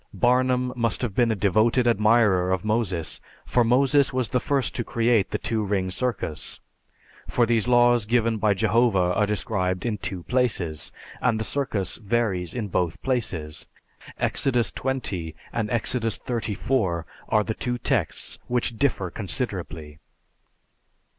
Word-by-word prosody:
Barnum 125 0 +2
must 115 -4 -1
have 115 -5 -2
been 120 +1 +2
a - - +1
devoted 110 +5 +2
admirer 105 -5 +3
of 95 +1 -1
Moses, 105 -7 -1 0.2
for 120 - +2
Moses 135 +4 +3
was 130 -3 0
the 125 - +1
first 135 0 0
to 120 - -2
create 115 -3 +1
the - - -1
two 110 -2 -1
ring 95 -2 -1
circus; 120 -8 -3 0.7
for 120 - +2
these 115 -1 +1
laws 120 -3 +4
given 115 -1 +2
by 105 -1 +2
Jehovah 105 -4 +2
are 105 +2 +2
described 95 -3 -1
in 110 -3 -1
two 90 -3 -4
places, 105 - 0 0.3
and 115 -3 +2
the - - -1
circus 110 -8 -2
varies 105 -5 -1
in 115 -4 -2
both 90 -3 -1
places. 90 - -2 0.5
Exodus 120 -4 +1
XX 95 - -2 0.2
and 110 -2 -1
Exodus 115 -3 0
XXXIV 110 -6 -1 0.3
are 105 - +3
the 110 - -2
two 125 +2 -2
texts - - -1
which 120 -2 0
differ 110 -10 0
considerably. 85 - -4
110 Hz, 140 wpm, -25 LUFS, 95-120 Hz, 0.7 s, laws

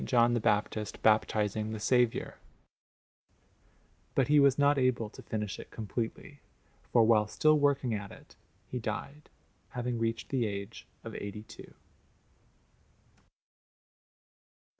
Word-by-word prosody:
John 120 -1 +3
the 120 - +2
Baptist 105 -1 -1
baptizing 110 0 +2
the 110 - -5
Saviour; 125 +1 +1 1.8
but 135 0 +2
he 150 0 +6
was 140 -2 +5
not 145 0 +4
able 120 -4 +1
to - - -12
finish 105 -3 -4
it - - -10
completely, 115 +6 -5 0.5
for 120 - +5
while 110 -2 +4
still 155 +7 +3
working 140 -4 +2
at 100 -2 -5
it - - -15 0.3
he 125 - -5
died, 135 +7 -6 0.5
having 120 -1 -2
reached 115 0 -2
the 125 -5 0
age 100 -1 -6 0.2
of - - -7
eighty 100 +1 -6
two. 110 - -13
115 Hz, 120 wpm, -30 LUFS, 105-130 Hz, 1.8 s, he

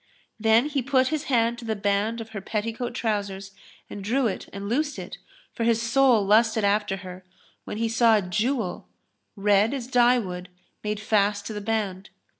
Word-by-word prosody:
" - - -44
Then 225 +4 +5
he 285 -2 -1
put 260 0 +2
his 310 -1 -2
hand 235 -2 +1
to 235 - -9
the 220 -1 -1
band 205 +3 0
of 225 - -9
her 210 -3 -6
petticoat 230 +4 -3
trousers 200 -4 -2 0.4
and 200 - -8
drew 250 +6 +1
it 210 - -3
and 200 +1 -6
loosed 290 +6 -1
it, - - -8 0.3
for 230 - -3
his 230 -1 +3
soul 235 -2 +3
lusted 220 +2 +3
after 200 -1 +1
her, 185 0 -9 0.4
when - - -5
he 230 +1 0
saw 225 0 +4
a 205 - -1
jewel, 215 +3 -2 0.5
red 205 +4 +3
as 255 -4 -4
dye 245 0 +4
wood, 180 -5 -5 0.3
made 210 0 -2
fast 205 -1 +1
to 220 - -5
the 210 - -5
band. 205 -3 -2
220 Hz, 190 wpm, -25 LUFS, 200-240 Hz, 0.5 s, Then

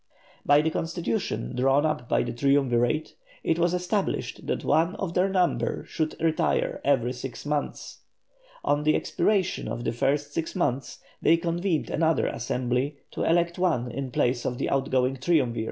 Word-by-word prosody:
By 145 +1 +5
the 160 - +1
constitution 170 - -2
drawn 135 +4 +3
up 140 -6 -2
by - - +2
the 120 0 -4
Triumvirate, 135 +1 +1 0.3
it 165 - +1
was 170 0 +3
established 180 +3 -2
that - - -1
one 165 +6 +2
of 190 -5 -4
their 185 +2 +2
number 185 -2 0
should 155 -2 -2
retire 160 -1 +1
every 130 -3 +2
six 130 +2 -7
months. 150 0 -3 0.6
On 145 0 +2
the 155 +1 +3
expiration 195 -4 0
of 115 +2 -4
the 120 - 0
first 145 +4 0
six 160 +1 -3
months, 135 -7 -1 0.2
they 165 - +5
convened 170 0 -1
another 160 0 +2
Assembly 125 +4 -1
to - - -5
elect 170 +1 +2
one 130 -10 +1
in 140 -1 -4
place 120 0 0
of 125 - -2
the - - -2
outgoing 135 -1 +1
Triumvir. 130 -5 +1
145 Hz, 160 wpm, -26 LUFS, 125-170 Hz, 0.6 s, By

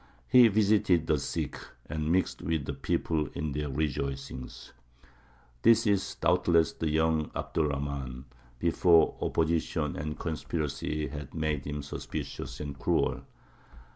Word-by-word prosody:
He 125 -2 +8
visited 100 -5 +3
the 75 -2 +2
sick, 70 - -3 0.3
and 75 +1 -2
mixed 90 +1 +1
with 80 -4 -1
the - - -3
people 80 -3 -1
in 75 0 -2
their 75 +1 -2
rejoicings." 70 -2 -4 0.9
This 115 0 +5
is 100 -3 +1
doubtless 85 -2 +3
the 80 - -2
young 80 0 +1
Abd - - -5
er 80 - +3
Rahmān, 70 -3 -4 0.3
before 85 +3 +4
opposition 80 -2 0
and 75 +2 -4
conspiracy 75 -1 -3
had 75 0 -8
made 75 -3 -1
him 75 -1 -4
suspicious 70 - -6
and 70 -2 -6
cruel. 70 - +1
75 Hz, 130 wpm, -29 LUFS, 70-85 Hz, 0.9 s, He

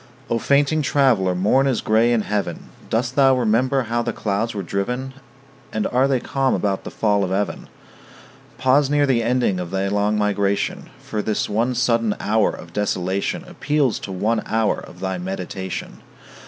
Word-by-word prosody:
O 115 - +2
fainting 145 +5 +2
traveller, 125 -11 +2
morn 105 +9 +3
is 130 -4 +1
gray 110 +2 +3
in 115 -2 +2
heaven. 105 0 -3 0.2
Dost 120 +3 -1
thou 135 -2 +5
remember 125 +3 +2
how 120 +1 -1
the - - -2
clouds 110 +2 -2
were 100 - -3
driven? 125 +7 -3 0.6
And 110 -1 -1
are 130 +2 +2
they 135 -2 +1
calm 135 +1 0
about 100 -2 -1
the - - -4
fall 105 -2 +1
of 95 - -1
even? 100 +2 -2 0.9
Pause 135 +2 +3
near 145 0 +3
the 130 -4 +2
ending 115 -5 +1
of 90 -1 -4
thy 95 +1 -1
long 105 +1 +1
migration; 100 -1 0
For 105 - -3
this 105 0 -1
one 115 +4 0
sudden 115 -3 +1
hour 110 0 +2
of 85 -1 -9
desolation 95 -1 -1
Appeals 145 -5 0
to 95 - -7
one 110 +4 0
hour 110 -1 +1
of - - -13
thy 95 -1 -2
meditation. 95 0 -5
110 Hz, 170 wpm, -21 LUFS, 100-130 Hz, 0.9 s, thou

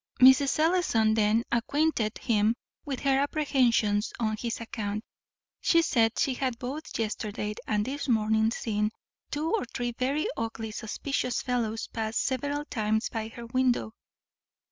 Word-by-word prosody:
Mrs. 265 +2 +7
Ellison 310 -10 +3
then 220 +1 +3
acquainted 235 -1 +1
him 220 -1 +2 0.3
with 275 -3 -4
her 270 -1 +3
apprehensions 250 -8 +2
on 215 -2 0
his 230 +2 -3
account. 215 -2 -4 0.6
She 335 -1 +4
said 230 -7 +2
she 270 - +2
had 255 -2 -2
both 280 +5 -5
yesterday 210 -1 -2
and 210 -1 +1
this 280 +3 -4
morning 220 -2 +3
seen 210 -2 -1 0.4
two 305 +3 -1
or 450 - +2
three 240 0 -3
very 265 +6 -1
ugly 225 -1 -4
suspicious 245 +3 -2
fellows 225 -3 -1
pass 220 0 -3
several 285 +3 -1
times 220 -3 0
by 220 -1 -3
her 235 +1 -9
window. 245 - +1
235 Hz, 140 wpm, -28 LUFS, 220-270 Hz, 0.6 s, Mrs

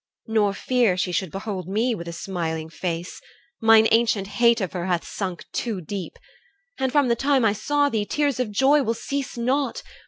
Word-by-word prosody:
Nor 210 -3 +1
fear 240 -7 +1
She 185 0 -1
should 185 0 -1
behold 195 -1 -5
me 225 +6 +1
with 170 -5 -6
a - - -4
smiling 165 -2 -4
face. 170 0 -4 0.4
Mine 225 0 +6
ancient 225 -3 +3
hate 235 +3 +3
of 190 -4 -3
her 180 -1 -3
hath 175 -2 0
sunk 185 -4 -5
too 225 -5 -2
deep. 185 +2 -6 0.6
And 265 -1 0
from 285 -1 +3
the 235 - +2
time 270 -1 +2
I 205 - +3
saw 290 +7 +1
thee, 220 -6 -1
tears 290 -4 0
of 250 -4 0
joy 270 +8 +4
Will 230 -3 -1
cease 275 +1 -4
not. 265 +4 -1
220 Hz, 190 wpm, -24 LUFS, 185-250 Hz, 0.6 s, Mine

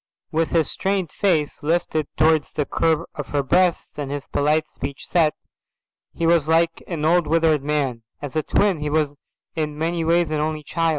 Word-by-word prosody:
With 165 0 +1
his 165 -3 +2
strained 190 -3 -1
face 165 -7 0
lifted 155 -1 0
towards 155 -1 +3
the 150 - -1
curve 160 +1 +1
of 150 -3 -6
her 145 -1 0
breasts, 175 +2 +1
and 140 -2 -3
his 140 0 -4
polite 155 +2 +1
set - - -30
speech, 140 0 -5 1.1
he 165 - -1
was 165 -3 +3
like 165 +1 +2
an 160 -4 -3
old 170 0 +3
withered 160 -2 +3
man. 140 -5 -1 0.2
As 145 -1 -7
a 155 - +2
twin 195 +2 +1
he 150 0 -2
was 150 -1 0 0.4
in 150 -2 -2
many 165 +2 -1
ways 165 0 +2
an 155 - 0
only 155 0 -2
child. 165 +3 0
155 Hz, 185 wpm, -22 LUFS, 150-165 Hz, 1.1 s, towards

